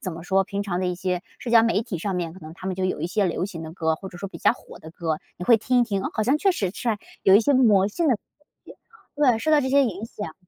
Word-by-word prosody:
怎 185 - -4
么 165 0 -8
说， 195 +2 +2
平 200 +1 -3
常 195 -3 -3
的 185 - 0
一 180 - -1
些 180 0 -2 0.2
社 240 - -6
交 230 -1 +7
媒 230 -1 +1
体 210 -7 -5
上 195 +3 -3
面， 170 -2 -3
可 - - -12
能 155 -1 -10
它 185 - -9
们 190 -1 -2
就 190 - -1
有 185 - -1
一 165 - -1
些 205 +2 +1
流 180 0 -1
行 175 -5 -8
的 160 0 -8
歌， 160 -2 0
或 190 - -9
者 175 - -11
说 195 - -5
比 - - -10
较 - - +4
火 - - -13
的 160 - -11
歌， 160 -2 -3 0.2
你 180 - -5
会 235 - +7
听 250 +3 +1
一 - - +5
听， 200 -5 -1
哦， - - -2
好 215 - -1
像 260 +7 +3
确 390 - +3
实 195 - -2
是 240 - -1 0.3
有 190 - +6
一 205 - +8
些 285 +5 +2
魔 210 -6 +4
性 330 +10 -1
的 265 - +4
东 - - -45 0.4
西， - - -13 0.4
对， 255 -6 +3
受 310 - -1
到 300 -1 +5
这 260 - -1
些 280 +1 +5
影 210 -3 -3
响。 205 -7 -7
195 Hz, 345 characters per minute, -24 LUFS, 180-230 Hz, 0.4 s, 一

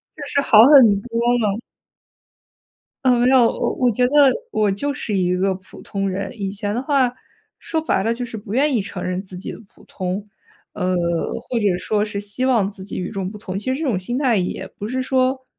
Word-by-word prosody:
就 305 - -8
是 280 - 0
好 225 -6 +5
很 280 -1 +9 0.2
多 230 +1 -5 0.2
了。 210 -1 0 1.5
呃， 245 -1 +4
让， 255 -2 +6
我 - - 0
我 250 - +2
觉 245 +3 +2
得 - - -6 0.4
我 210 - +1
就 280 +9 -2
是 215 -5 -3
一 180 -1 +1
个 190 +1 +1
普 185 0 -14
通 195 -1 -3
人。 195 +2 -3
以 195 -1 -2
前 205 +1 -3
的 245 - -1
话， 270 -3 +2 0.5
说 320 -1 -3
白 250 -10 0
了 230 - +1
就 245 +1 -4
是 230 - -8
不 205 -1 -7
愿 280 +3 +2
意 220 - +2
承 195 -2 -7
认 180 +1 -2
自 185 -2 -11
己 185 - -6
的 - - -11
普 - - -20
通， 185 +3 -4 0.5
呃， 185 0 -1 0.5
或 245 - -4
者 200 -4 +1
说 210 +3 0
是 210 -1 -4
希 205 +5 -2
望 230 -7 +2
自 195 -2 -11
己 195 - -6
与 180 - -3
众 195 -2 -4
不 210 - -9
同。 190 -2 -5
其 235 +6 -2
实 280 - -4
这 300 - -1
种 220 - +1
心 215 +7 -3
态 260 -4 +2
也 180 -3 -2
不 210 - -5
是 260 +1 -1
说， 260 0 0
210 Hz, 240 characters per minute, -21 LUFS, 195-255 Hz, 1.5 s, 很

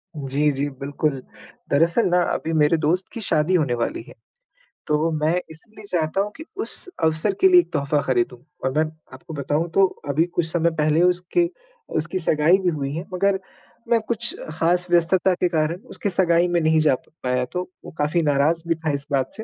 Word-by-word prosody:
जी, 145 +1 0
जी, 140 +1 -2
बिल्कुल। 140 0 -2 0.5
दरअसल 165 +9 +3
ना 180 0 +3
अभी 165 - -3
मेरे 155 +1 +3
दोस्त 165 +5 0
की 230 - -5
शादी 165 -2 +1
होने 145 -8 +2
वाली 120 -1 -2
है। 160 - -12 0.7
तो 150 +2 +1
मैं 155 +2 +1 0.2
इसलिए 210 +7 -11
चाहता 175 -1 0
हूँ 205 +1 -3
की 315 - -8
उस 395 - -3 0.2
अवसर 160 +5 +1
के 380 - +8
लिए 360 -1 +7
एक - - -16
तोहफ़ा 145 +1 +1
खरीदूँ। 125 -1 -1 0.2
और 130 - +1
मैं 155 - +3 0.3
आपको 130 +5 -10
बताऊँ 150 +3 -1
तो 195 +2 +5 0.2
अभी 145 +3 +3
कुछ 175 - +1
समय 170 0 +2
पहले 155 +1 +2
उसके 180 - +2 0.5
उसकी 170 +4 -2
सगाई 160 +1 +3
भी 180 - +3
हुई 140 -4 -3
है 165 +3 -4
मगर 195 +1 +1 0.5
मैं 235 -1 +4
कुछ 235 0 0 0.2
ख़ास 175 +3 +1
व्यस्तता 175 +2 +3
के 180 0 +1
कारण 160 +1 0
उसकी 205 - -3
सगाई 175 -2 +3
में 175 -1 +1
नहीं 160 0 +3
जा 150 -4 +4 0.3
पाया 125 0 0
तो 180 - -1 0.2
वो - - -8
काफ़ी 150 +4 +1
नाराज़ 150 +2 +2
भी 165 - +2
था 160 -1 -2
इस 140 0 -2
बात 135 -2 +1
से, 220 - -6
160 Hz, 195 wpm, -22 LUFS, 150-180 Hz, 0.7 s, के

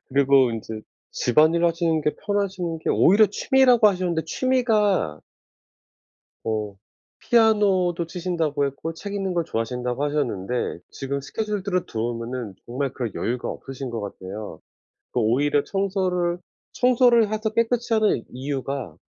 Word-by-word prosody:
그리고 135 -2 +4
인제 110 -1 -6 0.3
집안일하시는 165 +3 +2
게 150 - 0
편하신 190 -5 -1
게 - - -1
오히려 210 +4 +5
취미라고 245 +2 +4
하셨는데 180 -4 -1
취미가 215 - +1 1.2
뭐 105 -2 -3 0.4
피아노도 200 -7 +3
치신다고 165 -5 -1
했고 140 +4 -5
책 200 +5 -7
읽는 195 -2 -2
걸 170 - 0
좋아하신다고 125 +2 -2
하셨는데 125 - -2
지금 140 +1 -4
스케줄들을 200 +3 -2
들어 115 +2 -2
보면은 115 -3 -5
정말 135 +2 -2
그럴 120 -7 -4
여유가 120 +1 -2
없으신 135 -1 -6
거 115 - -4
같아요. 100 -2 -7 0.5
그 - - 0
오히려 140 +6 +2
청소를 185 -3 -1 0.3
청소를 240 -3 +4
해서 215 0 -1
깨끗이 230 +1 0
하는 215 - +2
이유가 135 - -4
160 Hz, 315 characters per minute, -24 LUFS, 125-200 Hz, 1.2 s, 오히려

